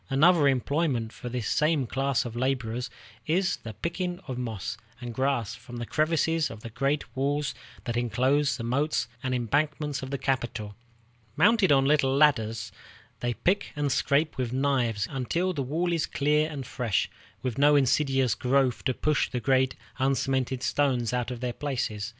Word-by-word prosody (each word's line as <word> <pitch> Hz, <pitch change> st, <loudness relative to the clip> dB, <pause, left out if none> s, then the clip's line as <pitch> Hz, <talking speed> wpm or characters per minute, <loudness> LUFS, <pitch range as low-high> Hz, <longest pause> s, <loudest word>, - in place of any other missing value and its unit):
Another 150 Hz, +2 st, +5 dB
employment 135 Hz, -3 st, 0 dB
for 125 Hz, -, -7 dB
this 120 Hz, -3 st, -3 dB
same 150 Hz, -3 st, +2 dB
class 135 Hz, +2 st, 0 dB
of 120 Hz, -1 st, -6 dB
laborers 125 Hz, -1 st, -1 dB, 0.4 s
is 180 Hz, +4 st, +1 dB
the 110 Hz, -2 st, -9 dB
picking 175 Hz, -, -3 dB
of 130 Hz, -, -3 dB
moss 115 Hz, -5 st, -4 dB, 0.2 s
and 120 Hz, -2 st, -6 dB
grass 130 Hz, -4 st, 0 dB
from 120 Hz, 0 st, -10 dB
the 120 Hz, -, -4 dB
crevices 160 Hz, +2 st, +1 dB
of 110 Hz, -1 st, -9 dB
the 115 Hz, -, -8 dB
great 135 Hz, +4 st, -1 dB
walls 140 Hz, +2 st, 0 dB, 0.3 s
that 120 Hz, -, -3 dB
inclose 130 Hz, +5 st, +1 dB
the 115 Hz, -, -5 dB
moats 140 Hz, +6 st, 0 dB
and 130 Hz, 0 st, -1 dB
embankments 145 Hz, +4 st, 0 dB
of 130 Hz, -, -6 dB
the 140 Hz, -, -2 dB
capital. 120 Hz, -6 st, -2 dB, 0.6 s
Mounted 210 Hz, -2 st, +4 dB
on 135 Hz, -1 st, +5 dB
little 135 Hz, -2 st, +3 dB
ladders, 115 Hz, -7 st, +2 dB, 0.5 s
they 120 Hz, -1 st, -1 dB
pick 195 Hz, +3 st, 0 dB
and 145 Hz, -1 st, 0 dB
scrape 145 Hz, +3 st, +1 dB
with 125 Hz, -2 st, -1 dB
knives 125 Hz, -6 st, +1 dB
until 165 Hz, +8 st, -1 dB
the 145 Hz, -, -2 dB
wall 165 Hz, +7 st, -1 dB
is 165 Hz, -3 st, 0 dB
clear 150 Hz, +2 st, +1 dB
and 140 Hz, -4 st, -6 dB
fresh, 120 Hz, -5 st, 0 dB, 0.4 s
with 130 Hz, -1 st, -2 dB
no 145 Hz, +1 st, +6 dB
insidious 135 Hz, -3 st, +3 dB
growth 130 Hz, 0 st, +1 dB
to 130 Hz, -2 st, +1 dB
push 150 Hz, -1 st, +1 dB
the 125 Hz, -, -2 dB
great 130 Hz, +2 st, +2 dB, 0.2 s
uncemented 130 Hz, -1 st, 0 dB
stones 130 Hz, -5 st, +1 dB
out 125 Hz, -1 st, -1 dB
of 125 Hz, -1 st, -6 dB
their 125 Hz, -1 st, -2 dB
places. 120 Hz, -7 st, -3 dB
135 Hz, 170 wpm, -27 LUFS, 120-145 Hz, 0.6 s, no